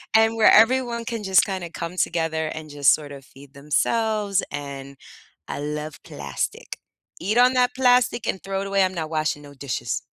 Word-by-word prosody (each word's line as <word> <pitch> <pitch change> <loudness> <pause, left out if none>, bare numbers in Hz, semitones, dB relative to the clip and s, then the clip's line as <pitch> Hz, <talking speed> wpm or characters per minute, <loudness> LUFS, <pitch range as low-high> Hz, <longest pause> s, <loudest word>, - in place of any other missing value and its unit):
And 225 0 +4
where 225 - +6
everyone 235 0 +4
can 230 -3 -4
just 190 -1 +4
kinda 185 -4 -4
come 170 +2 -6
together 160 -2 0
and 155 0 -7
just 145 -2 +4
sorta 145 -2 -10
feed 140 +1 -17
themselves, 205 +8 0
and 140 -1 -7 0.5
I - - -5
love 150 +1 -5
plastic. 70 -1 -5 0.4
Eat 210 +6 0
on 250 +1 +6
that 250 -1 +2
plastic 250 -3 +3
and 190 - -2
throw 195 0 -3
it 195 - -4
away. 195 -1 +2
I'm 185 0 0
not 160 -1 -4
washing 155 -1 -1
no 145 0 -13
dishes. 125 -4 -4
170 Hz, 175 wpm, -23 LUFS, 145-220 Hz, 0.5 s, where